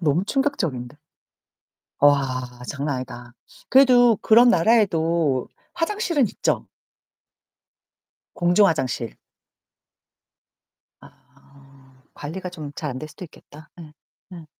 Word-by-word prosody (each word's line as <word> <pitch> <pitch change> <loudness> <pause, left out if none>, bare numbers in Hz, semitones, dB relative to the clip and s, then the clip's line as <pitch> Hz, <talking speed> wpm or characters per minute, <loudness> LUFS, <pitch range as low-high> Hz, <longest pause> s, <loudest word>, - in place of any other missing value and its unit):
너무 165 +3 +1
충격적인데. 170 - -2 1.0
와. 130 -4 +1
장난 140 0 -3
아니다. 120 -1 -9 0.4
그래도 245 -4 +5
그런 240 +3 +6
나라에도 170 - +2 0.3
화장실은 340 - 0
있죠? - - -2 1.7
공중 175 +3 +3
화장실. 125 - -2 1.9
아. 135 -1 -22
관리가 180 +5 -7
좀 155 -5 -9
잘 150 - -4
안될 155 +5 -7
수도 180 - -10
있겠다. 155 -1 -17
예. 155 -2 -13 0.4
예. 165 -3 -11
160 Hz, 195 characters per minute, -22 LUFS, 135-210 Hz, 1.9 s, 그런